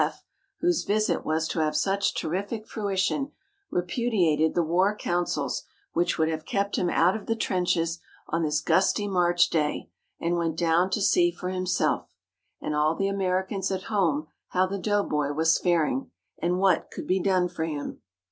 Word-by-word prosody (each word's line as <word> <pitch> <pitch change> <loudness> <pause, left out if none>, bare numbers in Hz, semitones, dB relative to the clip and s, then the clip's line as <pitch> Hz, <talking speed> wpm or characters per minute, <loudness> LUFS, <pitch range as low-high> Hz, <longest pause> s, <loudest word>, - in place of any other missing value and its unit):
F., - - -4 0.4
whose 350 -2 +2
visit 215 +2 +1
was 160 +1 0
to - - -2
have 155 -1 +1
such 195 +5 +1
terrific 200 +6 -3
fruition, 205 +7 -1 0.4
repudiated 175 -5 +1
the 175 - +3
war 185 +6 +2
counsels 175 -3 -1 0.3
which 175 +1 +1
would 160 - +2
have 160 -1 -2
kept 200 +3 -1
him 175 - +1
out 175 +4 +3
of 220 - -7
the 225 - +1
trenches 175 -5 0 0.3
on 165 +2 -1
this 155 -1 +1
gusty 195 +5 +2
March 175 -2 +3
day, 150 -2 -1 0.3
and 170 +1 0
went 165 -2 -1
down 170 +2 +3
to 200 +2 -1
see 345 - +4
for 180 - -5
himself 185 -1 0 0.5
and - - -3
all 150 +2 +2
the 195 - 0
Americans 190 0 -1
at 190 -1 -2
home 160 -7 +2 0.2
how 185 0 +2
the 195 +1 -4
doughboy 170 -9 0
was 160 +2 +3
faring, 175 - +1 0.3
and 175 +2 +1
what 185 -3 +2
could - - -7
be 185 +1 +1
done 185 -1 +2
for 175 -2 -3
him. 150 -3 -5
180 Hz, 170 wpm, -26 LUFS, 165-195 Hz, 0.5 s, see